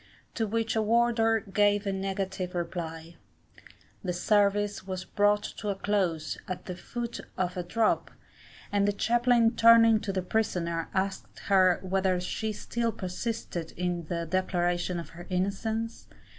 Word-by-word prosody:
to 225 Hz, -2 st, -1 dB
which 225 Hz, +1 st, -1 dB
a 220 Hz, -, +2 dB
warder 225 Hz, 0 st, +3 dB
gave 205 Hz, 0 st, +2 dB
a 195 Hz, -, 0 dB
negative 190 Hz, -1 st, -3 dB
reply. 170 Hz, -1 st, -5 dB, 0.9 s
The 180 Hz, -2 st, -1 dB
service 205 Hz, +1 st, +1 dB
was 185 Hz, -1 st, -4 dB
brought 205 Hz, 0 st, +2 dB
to 210 Hz, -, -3 dB
a 200 Hz, -, 0 dB
close 185 Hz, -6 st, -1 dB
at 185 Hz, -, -5 dB
the 180 Hz, -, -5 dB
foot 235 Hz, +6 st, -5 dB, 0.2 s
of 180 Hz, 0 st, -1 dB
a 180 Hz, -, -2 dB
drop, 215 Hz, +6 st, +1 dB, 0.6 s
and 200 Hz, 0 st, +2 dB
the 205 Hz, -, +2 dB
chaplain 235 Hz, +1 st, +3 dB
turning 230 Hz, -1 st, +7 dB
to 205 Hz, -1 st, -3 dB
the 190 Hz, -1 st, -2 dB
prisoner, 175 Hz, -5 st, -1 dB
asked 190 Hz, 0 st, -2 dB
her 185 Hz, -2 st, +5 dB
whether 190 Hz, -1 st, +1 dB
she 215 Hz, +4 st, -3 dB
still 230 Hz, +2 st, -2 dB
persisted 185 Hz, -3 st, -4 dB
in 175 Hz, -1 st, -2 dB
the 170 Hz, +1 st, -3 dB
declaration 175 Hz, 0 st, 0 dB
of 170 Hz, -, -8 dB
her 175 Hz, +1 st, -11 dB
innocence? 210 Hz, +5 st, -2 dB
195 Hz, 145 wpm, -28 LUFS, 180-220 Hz, 0.9 s, turning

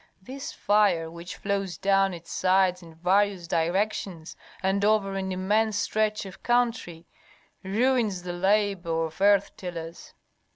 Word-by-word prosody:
This 265 Hz, +8 st, -7 dB
fire, 195 Hz, -6 st, +2 dB
which 170 Hz, +1 st, -8 dB
flows 195 Hz, -3 st, -2 dB
down 195 Hz, 0 st, +2 dB
its 170 Hz, -2 st, -10 dB
sides 185 Hz, -1 st, +2 dB
in 165 Hz, -2 st, -14 dB
various 185 Hz, +1 st, +1 dB
directions 175 Hz, 0 st, -1 dB, 0.3 s
and 195 Hz, +1 st, +1 dB
over 205 Hz, -2 st, +2 dB
an 190 Hz, -1 st, -3 dB
immense 205 Hz, +3 st, +1 dB
stretch 215 Hz, 0 st, 0 dB
of 190 Hz, -1 st, -11 dB
country, 230 Hz, -9 st, 0 dB, 0.6 s
ruins 215 Hz, -2 st, +1 dB
the 180 Hz, -1 st, -4 dB
labor 185 Hz, -3 st, +1 dB
of 160 Hz, +4 st, -9 dB
earth 200 Hz, 0 st, +3 dB
tillers. 170 Hz, -2 st, -8 dB
195 Hz, 130 wpm, -26 LUFS, 175-205 Hz, 0.6 s, earth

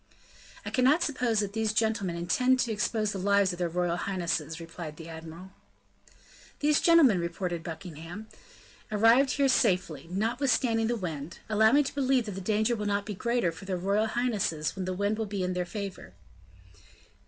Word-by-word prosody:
"I -, -, -4 dB
cannot 270 Hz, +7 st, +3 dB
suppose 245 Hz, -6 st, 0 dB
that 200 Hz, -1 st, -4 dB
these 220 Hz, -1 st, 0 dB
gentlemen 220 Hz, -5 st, 0 dB
intend 250 Hz, +10 st, +2 dB
to 240 Hz, -, -1 dB
expose 215 Hz, 0 st, 0 dB
the 195 Hz, -, -4 dB
lives 200 Hz, -1 st, +2 dB
of 175 Hz, -, -8 dB
their 175 Hz, -1 st, 0 dB
royal 175 Hz, 0 st, -1 dB
highnesses," 170 Hz, -4 st, -2 dB
replied 165 Hz, -2 st, -8 dB
the 165 Hz, -, -9 dB
admiral. 165 Hz, +3 st, -10 dB, 1.1 s
"These 300 Hz, 0 st, +3 dB
gentlemen," 310 Hz, -, +5 dB
retorted 170 Hz, 0 st, -3 dB
Buckingham, 165 Hz, +4 st, -8 dB, 0.7 s
"arrived 230 Hz, +6 st, +5 dB
here 280 Hz, -1 st, +2 dB
safely, 180 Hz, -, +1 dB
notwithstanding 225 Hz, +3 st, +1 dB
the 240 Hz, -, 0 dB
wind; 165 Hz, -7 st, -5 dB
allow 220 Hz, +1 st, +4 dB
me 290 Hz, +2 st, +5 dB
to -, -, -5 dB
believe 265 Hz, -3 st, +1 dB
that 210 Hz, -, -5 dB
the 195 Hz, 0 st, -6 dB
danger 215 Hz, +4 st, +1 dB
will 210 Hz, -2 st, -3 dB
not 200 Hz, 0 st, 0 dB
be 210 Hz, -, -4 dB
greater 235 Hz, -2 st, 0 dB
for 165 Hz, +4 st, -11 dB
their 190 Hz, -1 st, -2 dB
royal 200 Hz, +4 st, +1 dB
highnesses 210 Hz, -10 st, -1 dB
when 190 Hz, -1 st, -4 dB
the 185 Hz, 0 st, -3 dB
wind 205 Hz, +3 st, -1 dB
will 220 Hz, -, -2 dB
be 200 Hz, -2 st, -3 dB
in 180 Hz, 0 st, -1 dB
their 180 Hz, 0 st, -2 dB
favor." 200 Hz, +1 st, -7 dB
200 Hz, 175 wpm, -28 LUFS, 175-230 Hz, 1.1 s, gentlemen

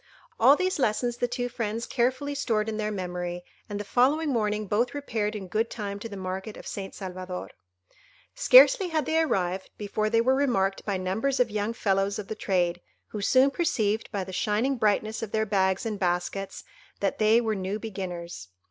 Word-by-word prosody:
All 260 Hz, +5 st, +7 dB
these 370 Hz, 0 st, -1 dB
lessons 240 Hz, 0 st, 0 dB
the 245 Hz, -, 0 dB
two 245 Hz, 0 st, -2 dB
friends 230 Hz, -1 st, -3 dB
carefully 260 Hz, +3 st, 0 dB
stored 225 Hz, -6 st, 0 dB
in 220 Hz, -1 st, -3 dB
their 215 Hz, -1 st, -1 dB
memory, 180 Hz, -3 st, -4 dB, 0.3 s
and 205 Hz, 0 st, -4 dB
the -, -, -3 dB
following 275 Hz, +9 st, +2 dB
morning 215 Hz, -4 st, 0 dB
both 225 Hz, +7 st, 0 dB
repaired 220 Hz, -7 st, -2 dB
in 195 Hz, -3 st, -6 dB
good 220 Hz, +5 st, 0 dB
time 200 Hz, -2 st, -5 dB
to 230 Hz, -, -6 dB
the 200 Hz, -, -7 dB
market 190 Hz, +3 st, -5 dB
of -, -, -11 dB
St. 195 Hz, -1 st, -6 dB
Salvador. 185 Hz, -1 st, -6 dB, 0.8 s
Scarcely -, -, +7 dB
had 315 Hz, -3 st, -1 dB
they 320 Hz, +1 st, +2 dB
arrived 190 Hz, -, -1 dB
before 215 Hz, +1 st, -1 dB
they 230 Hz, -, +3 dB
were 255 Hz, +3 st, +3 dB
remarked 220 Hz, -9 st, +1 dB
by 200 Hz, -2 st, -1 dB
numbers 220 Hz, +9 st, -1 dB
of 240 Hz, -3 st, +2 dB
young 210 Hz, +2 st, -1 dB
fellows 195 Hz, -2 st, 0 dB
of 210 Hz, -2 st, -7 dB
the -, -, -2 dB
trade, 180 Hz, -4 st, 0 dB, 0.3 s
who 210 Hz, -, -5 dB
soon 260 Hz, +6 st, +4 dB
perceived, 220 Hz, -, 0 dB
by 200 Hz, -3 st, -2 dB
the 190 Hz, 0 st, -9 dB
shining 220 Hz, +8 st, +1 dB
brightness 215 Hz, -1 st, 0 dB
of 225 Hz, -3 st, -5 dB
their 220 Hz, 0 st, +1 dB
bags 190 Hz, -1 st, +1 dB
and 215 Hz, -3 st, -3 dB
baskets, 180 Hz, +1 st, -2 dB, 0.4 s
that 195 Hz, -, -1 dB
they 220 Hz, +2 st, +5 dB
were 225 Hz, -2 st, 0 dB
new 195 Hz, +1 st, -3 dB
beginners. 180 Hz, -, -6 dB
215 Hz, 190 wpm, -27 LUFS, 195-245 Hz, 0.8 s, All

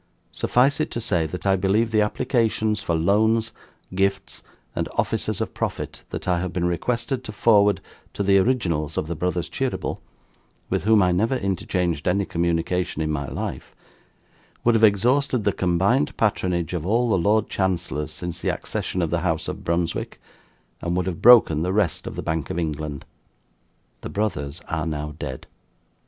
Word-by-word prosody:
Suffice 135 Hz, +4 st, +2 dB
it 155 Hz, -, 0 dB
to -, -, -4 dB
say, 90 Hz, -9 st, 0 dB
that 90 Hz, +5 st, -7 dB
I 95 Hz, -1 st, +4 dB
believe 100 Hz, +4 st, +1 dB
the 110 Hz, -1 st, +3 dB
applications 110 Hz, -1 st, +1 dB
for 85 Hz, -7 st, -1 dB
loans, 110 Hz, +6 st, +2 dB, 0.4 s
gifts, 95 Hz, +1 st, -1 dB, 0.3 s
and -, -, -2 dB
offices -, -, -1 dB
of -, -, -3 dB
profit -, -, -4 dB
that -, -, -6 dB
I 90 Hz, -1 st, +2 dB
have 90 Hz, 0 st, -3 dB
been 90 Hz, -1 st, -1 dB
requested 120 Hz, +8 st, -1 dB
to 110 Hz, -, -6 dB
forward 105 Hz, -3 st, +4 dB, 0.3 s
to 100 Hz, -, -2 dB
the 100 Hz, 0 st, +5 dB
originals 85 Hz, -, 0 dB
of -, -, 0 dB
the 85 Hz, -, -3 dB
BROTHERS 90 Hz, +1 st, -1 dB
CHEERYBLE 135 Hz, -1 st, -3 dB, 0.7 s
(with -, -, 0 dB
whom 110 Hz, -2 st, +5 dB
I 90 Hz, -, +3 dB
never 110 Hz, +9 st, +1 dB
interchanged 90 Hz, -, -1 dB
any 100 Hz, +2 st, +2 dB
communication 85 Hz, -1 st, -1 dB
in 75 Hz, -, -1 dB
my 70 Hz, -2 st, -2 dB
life) 65 Hz, -, -5 dB, 0.9 s
would 120 Hz, -, +4 dB
have 115 Hz, 0 st, +2 dB
exhausted 120 Hz, +4 st, +3 dB
the 100 Hz, -, +2 dB
combined 95 Hz, +10 st, +1 dB
patronage 90 Hz, -6 st, 0 dB
of 85 Hz, -4 st, -2 dB
all 115 Hz, +6 st, +1 dB
the 95 Hz, -, +3 dB
Lord 105 Hz, +4 st, +2 dB
Chancellors 85 Hz, -5 st, -1 dB
since 90 Hz, +1 st, -5 dB
the -, -, 0 dB
accession 90 Hz, -, -2 dB
of 80 Hz, -, -2 dB
the 85 Hz, -, +1 dB
House 80 Hz, -2 st, -1 dB
of -, -, -5 dB
Brunswick, 85 Hz, 0 st, -2 dB, 0.6 s
and 85 Hz, +1 st, -1 dB
would 90 Hz, -, 0 dB
have 90 Hz, -3 st, -4 dB
broken 110 Hz, -11 st, +7 dB
the 90 Hz, +2 st, 0 dB
Rest 100 Hz, -6 st, 0 dB
of -, -, -6 dB
the -, -, -4 dB
Bank 80 Hz, -3 st, -2 dB
of -, -, -3 dB
England. 75 Hz, -3 st, -3 dB, 1.0 s
The -, -, -6 dB
Brothers 85 Hz, -7 st, -2 dB
are 80 Hz, -1 st, -2 dB
now 75 Hz, -1 st, -3 dB
dead. 65 Hz, -1 st, -6 dB
95 Hz, 175 wpm, -23 LUFS, 85-110 Hz, 1.0 s, broken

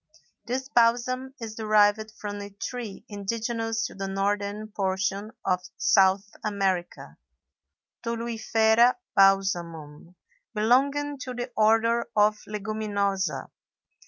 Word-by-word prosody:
This 260 Hz, +2 st, -2 dB
balsam 255 Hz, +2 st, +1 dB
is 225 Hz, -2 st, -6 dB
derived 215 Hz, 0 st, +3 dB
from 205 Hz, -1 st, -5 dB
a 200 Hz, -, -7 dB
tree 210 Hz, +1 st, -6 dB
indigenous 225 Hz, +2 st, -2 dB
to -, -, -6 dB
the 195 Hz, 0 st, -5 dB
northern 200 Hz, +2 st, -2 dB
portion 200 Hz, +1 st, -1 dB, 0.2 s
of 180 Hz, 0 st, +1 dB, 0.2 s
South 195 Hz, +1 st, +4 dB, 0.2 s
America, 195 Hz, -4 st, -2 dB, 0.9 s
Toluifera 230 Hz, 0 st, +2 dB, 0.2 s
Balsamum, 175 Hz, -5 st, +1 dB, 0.4 s
belonging 275 Hz, +6 st, +2 dB
to 255 Hz, -2 st, -6 dB
the 245 Hz, +1 st, -4 dB
Order 225 Hz, +2 st, +3 dB
of 210 Hz, 0 st, +3 dB
Leguminosæ. 200 Hz, -3 st, -2 dB
215 Hz, 100 wpm, -26 LUFS, 195-230 Hz, 0.9 s, South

